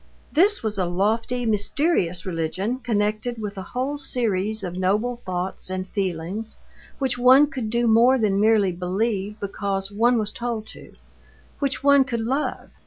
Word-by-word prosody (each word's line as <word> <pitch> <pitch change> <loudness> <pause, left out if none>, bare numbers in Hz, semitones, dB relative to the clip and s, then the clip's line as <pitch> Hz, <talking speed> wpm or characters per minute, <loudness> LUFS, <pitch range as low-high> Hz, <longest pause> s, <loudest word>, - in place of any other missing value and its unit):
This 390 - +3
was 210 -2 -1
a 180 - +1
lofty, 225 +7 0
mysterious 210 - +1
religion 185 +7 -2
connected 215 0 -1
with 210 -2 -5
a 190 - -5 0.2
whole 280 +3 -1
series 220 -6 -1
of 180 -1 -4
noble 205 +7 0
thoughts 185 -3 -4
and 185 0 -4
feelings, 190 +3 -3 0.4
which 260 -3 -1
one 260 +4 +7
could 260 -7 -5
do 235 +2 +1
more 235 +3 +5
than 205 -4 +1
merely 215 -3 +4
believe 195 +3 -2
because 195 -1 -3
one 235 +4 +3
was 215 -1 -1
told 235 -2 -4
to, - - -14 0.7
which 275 -1 -1
one 280 -1 +6
could 235 -3 -3
love. 265 +6 -2
220 Hz, 155 wpm, -23 LUFS, 195-245 Hz, 0.7 s, one